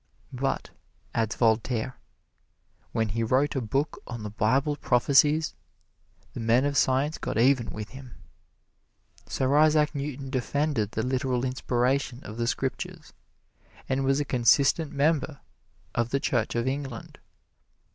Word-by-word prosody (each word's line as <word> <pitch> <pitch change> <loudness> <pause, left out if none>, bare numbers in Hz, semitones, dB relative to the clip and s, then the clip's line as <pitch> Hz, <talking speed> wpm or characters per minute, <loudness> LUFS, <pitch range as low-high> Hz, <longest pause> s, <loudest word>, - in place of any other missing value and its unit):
"But," 135 +2 -2 0.4
adds 115 -1 0
Voltaire, 115 +1 +1 1.0
"when 110 -1 0
he 115 +3 -2
wrote 130 +6 +1
a 135 - 0
book 135 +6 -2
on 120 -3 -6
the 105 - -5
Bible 130 +8 +1
prophecies, 145 +4 +3 0.8
the - - -6
men 115 +4 +3
of 145 0 -1
science 135 +4 +2
got - - -3
even 125 0 +3
with 105 0 -6
him." 130 -2 -11 1.1
Sir 135 +2 0
Isaac 155 0 +4
Newton 140 -2 -5
defended 130 -4 -1
the 110 - -1
literal 130 -1 0
inspiration 130 +1 -1
of 110 - -8
the 115 0 -1
Scriptures 130 +1 -4 0.7
and 135 +1 0
was 135 +1 +2
a 145 - -1
consistent 140 +5 +3
member 145 0 0 0.5
of 120 -1 0
the 140 - 0
Church 120 -5 0
of 120 +1 0
England. 135 -3 -5
130 Hz, 135 wpm, -27 LUFS, 120-140 Hz, 1.1 s, Isaac